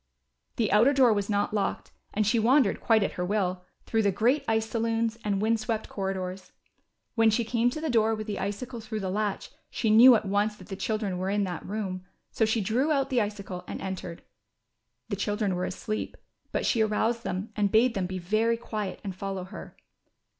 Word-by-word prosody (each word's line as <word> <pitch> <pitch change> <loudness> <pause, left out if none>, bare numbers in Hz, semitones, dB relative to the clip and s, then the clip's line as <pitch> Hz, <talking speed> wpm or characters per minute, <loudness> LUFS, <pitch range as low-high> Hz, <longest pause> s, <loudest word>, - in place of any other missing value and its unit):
The 225 -3 0
outer 225 +8 +5
door 255 -4 +5
was 205 -1 -2
not 205 0 0
locked 205 -2 -2 0.2
and 215 0 0
she 225 +3 +2
wandered 245 0 +3
quite 220 -3 +4
at - - -1
her 180 - -4
will, 185 -1 -1 0.2
through 225 - +1
the 200 -2 +2
great 240 +9 +2
ice 220 0 +1
saloons, 230 0 -1
and 200 -2 0
wind 220 +2 +2
swept 220 0 -3
corridors. 190 -1 -4 0.6
When 225 -1 +4
she 220 +2 +1
came 235 +1 +2
to 280 - -5
the 320 - -3
door 225 -1 +3
with 215 0 -5
the 210 -2 -4
icicle 215 +5 -4
through 215 -1 -5
the 190 -1 -2
latch, 205 0 -2 0.2
she 220 - 0
knew 240 +3 +9
at 215 - 0
once 205 +2 +1
that 185 -3 -15
the 195 - -4
children 205 -2 -2
were 185 +1 -1
in 205 +1 +1
that 180 -3 -4
room, 190 -3 -4 0.3
so 220 - +2
she 220 0 +1
drew 245 +10 +1
out 275 -2 +1
the 245 -2 +3
icicle 200 -3 -5
and - - -5
entered. 185 -3 -6 0.9
The - - -1
children 205 0 -1
were 180 0 -1
asleep, 215 +3 -4 0.3
but - - -1
she 230 - +2
aroused 220 +2 +1
them, 185 +4 -4
and 205 -2 +1
bade 230 +2 +4
them 190 -2 -1
be 185 0 -4
very 215 +6 +1
quiet 215 -4 -5
and 195 -3 -5
follow 195 -1 -4
her. 185 - -10
215 Hz, 205 wpm, -27 LUFS, 195-225 Hz, 0.9 s, knew